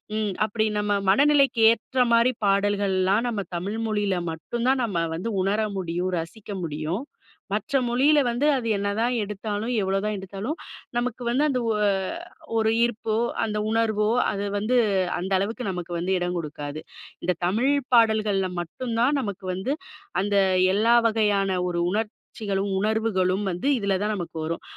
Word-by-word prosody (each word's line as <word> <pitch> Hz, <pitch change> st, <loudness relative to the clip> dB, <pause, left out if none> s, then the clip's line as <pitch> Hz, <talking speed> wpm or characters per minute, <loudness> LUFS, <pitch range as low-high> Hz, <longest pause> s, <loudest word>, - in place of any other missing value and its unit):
ம் 215 Hz, -2 st, -1 dB
அப்டி 215 Hz, +1 st, 0 dB
நம்ம 205 Hz, 0 st, 0 dB, 0.2 s
மனநிலைக்கு 275 Hz, +1 st, +4 dB
ஏற்ற 240 Hz, +3 st, -1 dB
மாரி 235 Hz, +2 st, +5 dB
பாடல்கள்லாம், 200 Hz, 0 st, +2 dB
நம்ம 220 Hz, -4 st, -1 dB
தமிழ் 195 Hz, +5 st, -3 dB
மொழில 205 Hz, -3 st, 0 dB, 0.2 s
மட்டும்தான் 240 Hz, -, -1 dB
நம்ம 195 Hz, -7 st, -1 dB, 0.2 s
வந்து 180 Hz, +8 st, -3 dB
உணர 200 Hz, +3 st, +1 dB, 0.2 s
முடியும், 180 Hz, 0 st, -2 dB
ரசிக்க 205 Hz, +6 st, -8 dB
முடியும். 160 Hz, -, -3 dB, 0.5 s
மற்ற 215 Hz, +6 st, 0 dB
மொழில 275 Hz, +5 st, +4 dB
வந்து 240 Hz, +5 st, +1 dB
அது 235 Hz, -3 st, -3 dB
என்னதான் 205 Hz, +5 st, 0 dB
எடுத்தாலும், 210 Hz, +3 st, -3 dB
எவ்வளோதான் 195 Hz, +2 st, -1 dB
எடுத்தாலும், 200 Hz, -, -5 dB, 0.4 s
நமக்கு 245 Hz, 0 st, -2 dB
வந்து 260 Hz, +5 st, +2 dB
அந்த 255 Hz, -, 0 dB
ஒ -, -, +2 dB, 0.8 s
ஒரு 220 Hz, 0 st, +2 dB
ஈர்ப்போ 225 Hz, -2 st, -1 dB, 0.3 s
அந்த 210 Hz, -1 st, -3 dB
உணர்வோ, 220 Hz, -2 st, +1 dB, 0.2 s
அது 200 Hz, 0 st, -3 dB
வந்து 220 Hz, +5 st, +1 dB, 0.4 s
அந்த 190 Hz, +2 st, -4 dB
அளவுக்கு 225 Hz, +6 st, -3 dB
நமக்கு 175 Hz, -1 st, -5 dB
வந்து 185 Hz, +2 st, 0 dB
எடம் 180 Hz, 0 st, -2 dB
குடுக்காது. 150 Hz, -1 st, -6 dB, 0.4 s
இந்த 180 Hz, 0 st, +1 dB
தமிழ் 230 Hz, +9 st, +2 dB, 0.2 s
பாடல்கள்ல 215 Hz, -4 st, +3 dB
மட்டும்தான் 240 Hz, -, 0 dB
நமக்கு 200 Hz, -4 st, -5 dB
வந்து, 205 Hz, +9 st, -2 dB, 0.5 s
அந்த 200 Hz, 0 st, +1 dB, 0.4 s
எல்லா 230 Hz, +3 st, +4 dB
வகையான 205 Hz, -4 st, +1 dB
ஒரு 170 Hz, -1 st, -1 dB
உணர்ச்சிகளும், 210 Hz, -2 st, -3 dB
உணர்வுகளும் 205 Hz, -3 st, +1 dB
வந்து 180 Hz, +10 st, -3 dB
இதுலதான் 200 Hz, 0 st, 0 dB
நமக்கு 170 Hz, -3 st, -6 dB
வரும். 165 Hz, +1 st, -4 dB
205 Hz, 140 wpm, -25 LUFS, 190-230 Hz, 0.8 s, மாரி